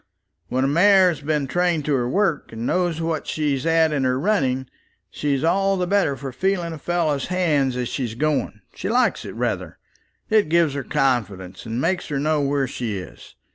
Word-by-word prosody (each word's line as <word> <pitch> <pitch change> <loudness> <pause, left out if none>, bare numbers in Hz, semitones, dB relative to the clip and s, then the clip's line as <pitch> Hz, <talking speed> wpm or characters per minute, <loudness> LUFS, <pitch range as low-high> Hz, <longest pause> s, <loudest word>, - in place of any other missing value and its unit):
When 130 +1 0
a - - +2
mare 185 +5 +5
has 165 - -4
been 150 -1 0
trained 170 +1 0
to 150 - +1
her 125 -2 0
work, 190 -1 0
and 115 +1 -5
knows 175 -1 0
what 165 -2 -2
she's 145 -2 -1
at 165 -1 +3
in 140 -2 0
her 130 0 +1
running, 135 -8 +1 0.5
she's 140 -1 -1
all 195 +3 +2
the 180 - 0
better 190 -6 +1
for 135 -1 -6
feeling 175 +3 -1
a 160 - -8
fellow's 155 -4 -1
hands 150 -8 +1
as 125 -1 -2
she's 120 -4 -3
going. 145 -6 -1
She - - -4
likes 250 +3 +1
it - - -7
rather. - - -3 0.5
It 215 -7 +3
gives 165 -3 +3
her 140 - -3
confidence, 105 -9 -1
and 115 +2 -3
makes 175 +5 0
her 145 - -2
know 150 +1 +1
where 140 -1 0
she 115 -5 -4
is. 90 - -11
150 Hz, 195 wpm, -22 LUFS, 130-175 Hz, 0.5 s, mare